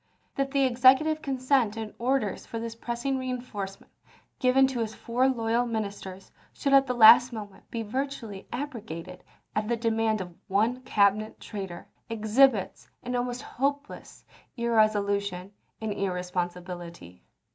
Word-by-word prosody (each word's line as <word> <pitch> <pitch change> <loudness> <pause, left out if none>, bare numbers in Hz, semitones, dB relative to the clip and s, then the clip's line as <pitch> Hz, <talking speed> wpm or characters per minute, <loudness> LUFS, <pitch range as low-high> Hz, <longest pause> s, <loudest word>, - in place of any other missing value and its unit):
That 275 0 -1
the 275 0 +2
Executive 265 +5 +4
consent 255 -5 +1
and 220 -1 -5
orders 245 -4 -1
for 230 - -5
this 230 0 -4
pressing 240 +4 -3
reenforcement 240 -7 -6 0.5
given 260 +1 +5
to 265 -2 -2
his 220 -1 -3
four 250 +3 +1
loyal 235 -1 0
ministers 200 -4 -5 0.2
should 275 - -1
at 270 0 +6
the 250 - -1
last 240 +2 +8
moment 210 -4 -9
be 230 -1 -3
virtually 230 -4 -4
abrogated 220 - -6 0.3
at 215 0 0
the 235 +1 0
demand 225 -1 +1
of 180 -2 -6
one 225 +6 +1
Cabinet 215 -2 +1
traitor 190 -5 -7 0.2
exhibits 225 0 +2
an 250 0 -3
almost 245 0 -2
hopeless 280 +3 -4 0.3
irresolution 205 -4 +1 0.3
and 220 -2 -3
irresponsibility. 180 - -4
225 Hz, 130 wpm, -27 LUFS, 200-255 Hz, 0.5 s, last